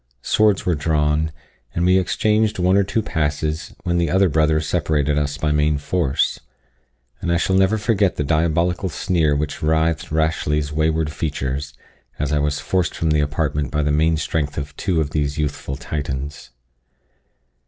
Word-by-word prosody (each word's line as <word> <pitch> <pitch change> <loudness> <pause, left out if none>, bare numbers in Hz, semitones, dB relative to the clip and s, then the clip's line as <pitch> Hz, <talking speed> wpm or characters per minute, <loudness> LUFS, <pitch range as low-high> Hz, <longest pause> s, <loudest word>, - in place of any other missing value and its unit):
Swords 105 -3 +2
were 90 - +2
drawn, 75 0 +1 0.4
and 85 - +1
we 90 +1 +5
exchanged 105 +3 +1
one 90 +1 +3
or 100 - +4
two 100 +3 -1
passes, 75 -2 -2
when 85 0 0
the 85 -2 +1
other 95 +2 +3
brothers 80 0 +2
separated 75 -3 +1
us 75 0 -1
by 75 - 0
main 75 0 +2
force; 70 -1 0 0.8
and 85 - -1
I 85 - +3
shall 95 +2 +1
never 95 +3 +3
forget 105 -4 +1
the - - -1
diabolical 85 +4 +1
sneer 80 -3 +1
which 70 0 -3
writhed 80 0 +1
Rashleigh's 75 -2 0
wayward 80 0 +1
features, 70 -2 -3 0.4
as 75 0 -2
I 75 - +2
was 75 0 0
forced 90 +6 -1
from 80 -1 0
the 75 -1 +3
apartment 75 -1 -1
by 75 +4 0
the 75 - +1
main 80 +2 +2
strength 75 -1 -2
of 70 -1 -5
two 90 -5 0
of 75 -2 -2
these 75 -1 -1
youthful 75 -2 -3
Titans. 70 0 -5
80 Hz, 165 wpm, -21 LUFS, 75-85 Hz, 0.8 s, we